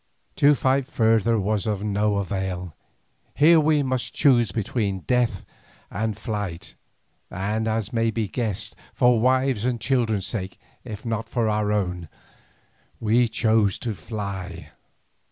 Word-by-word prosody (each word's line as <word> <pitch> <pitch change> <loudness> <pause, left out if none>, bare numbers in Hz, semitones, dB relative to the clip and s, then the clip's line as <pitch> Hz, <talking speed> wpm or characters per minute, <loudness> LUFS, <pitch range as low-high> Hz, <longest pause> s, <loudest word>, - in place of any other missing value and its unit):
To 145 +1 +5
fight 135 0 +1
further 115 -4 +2
was 105 +1 -1
of 105 -2 -1
no 105 0 +1
avail, 95 -3 -3 0.6
here 160 +3 +6
we 150 -1 +3
must 130 -2 -2
choose 120 -7 +4
between 100 -3 -2
death 120 -3 0 0.5
and 110 +2 -2
flight, 105 -5 -5 0.6
and 105 +4 -2
as 110 -1 -2
may 115 -1 +2
be 110 -1 -2
guessed, 110 -1 -3 0.2
for 125 -2 +4
wives' 130 -1 +2
and 125 -1 0
children's 115 -5 0
sake 95 -4 -4 0.3
if 110 -3 -8
not 115 -1 -3
for 115 -2 0
our 105 -1 0
own, 90 -5 -2 0.9
we 115 +2 +3
chose 110 -3 +2
to 115 - -3
fly. 100 -3 -6
110 Hz, 135 wpm, -24 LUFS, 100-120 Hz, 0.9 s, here